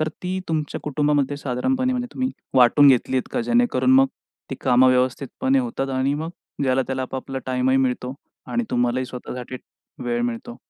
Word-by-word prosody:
तर 155 - +1
ती 185 +1 -2
तुमच्या 155 -2 -2
कुटुंबामध्ये 145 -1 0
साधारणपणे, 255 - -1
म्हणजे 245 -1 -2
तुम्ही 260 0 -1 0.2
वाटून 130 +3 +6
घेतली 130 0 +3
आहेत 130 - -1
का? - - 0
जेणेकरून 245 +2 +2
मग 270 0 +6 0.4
ती - - -2
कामं 130 0 +5
व्यवस्थितपणे 130 - +1
होतात 230 - -2
आणि 135 +1 0
मग 160 +3 -4 0.3
ज्याला-त्याला 130 0 0
आपापला 130 +1 -5
टाइमही 130 0 +1
मिळतो 130 -1 -1 0.4
आणि 240 0 0
तुम्हालाही 125 +1 0
स्वतःसाठी 125 0 -7 0.5
वेळ 120 -1 -1
मिळतो. 120 0 -4
135 Hz, 155 wpm, -22 LUFS, 125-180 Hz, 0.5 s, वाटून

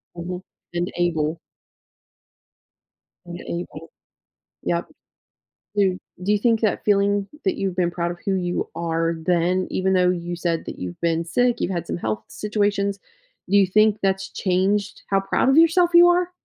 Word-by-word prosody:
Mhm, 180 +1 -5 0.3
and 175 +1 -2
able. 165 -2 0 1.9
And 175 0 -8
able. 165 -2 -6 0.7
Yep. 170 0 -1 0.9
Do 195 -3 +2 0.3
do 205 - +1
you 210 - +4
think 225 +1 +2
that 215 -3 0
feeling 200 -1 +2 0.2
that 380 -4 +1
you've 195 -7 -2
been 175 -1 +1
proud 170 0 -2
of 175 - -9
who 195 - +1
you 180 -1 -2
are 165 0 -1
then, 180 +1 +1
even 190 0 +1
though 180 -1 +4
you 175 -1 -4
said 170 -1 -2
that - - -7
you've 90 -1 -6
been 165 0 0
sick, 245 +7 +1
you've 190 - -1
had 170 -2 -3
some - - -3
health 110 -8 -3
situations, 205 -1 -1 0.5
do 200 - +4
you 195 - +6
think 215 +2 +4
that's 195 0 0
changed 195 +2 0
how 195 - +3
proud 195 +6 +1
of 270 - +4
yourself 335 +2 +5
you 345 0 +8
are? 355 0 +2
185 Hz, 165 wpm, -23 LUFS, 170-205 Hz, 1.9 s, you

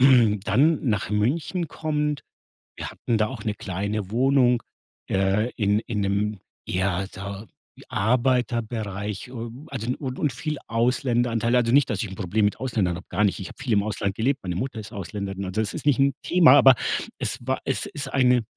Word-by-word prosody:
dann 125 +3 +4
nach 105 -2 0
München 150 - 0
kommend. 150 -2 -2 0.5
Wir - - -5
hatten 115 - -1
da 110 0 +2
auch 125 -4 -7
'ne 105 -3 -1
kleine 100 +1 -3
Wohnung, 125 -1 +3 0.5
äh, 95 +5 +1
in 105 -1 +2
in 110 -2 -3
'nem 100 +1 0 0.3
eher 95 +1 0
da 100 +2 -7 0.3
wie - - -15
Arbeiterbereich, 115 -3 0
ähm, 120 +3 -7
also 125 -2 -2
und 130 -3 -5
und 150 - +1
viel 150 +3 -3
Ausländeranteil. 120 -1 +1
Also, 120 -2 +3
nicht, 140 +1 +4
dass 105 +1 -1
ich 105 - -5
'n 95 - -8
Problem 105 +1 0
mit 105 - 0
Ausländern 110 -9 0
habe, 90 - -11
gar 105 - +1
nicht. 100 -1 +1
Ich 95 - -5
habe - - -14
viel 120 - 0
im 100 -1 +3
Ausland 100 -2 -2
gelebt, 135 +5 0
meine 90 -2 -3
Mutter 120 +3 -3
ist 110 +1 -9
Ausländerin. 100 0 -5
Also, 95 +4 -1
es 105 - -2
ist 150 - -6
nicht 140 -2 +3
'n 140 0 +4
Thema, 170 -6 +6
aber 135 -2 +8 0.4
es - - -2
war 130 +2 -1
es - - -1
ist 145 -9 -6
eine 125 -3 +4
115 Hz, 185 wpm, -25 LUFS, 100-130 Hz, 0.5 s, aber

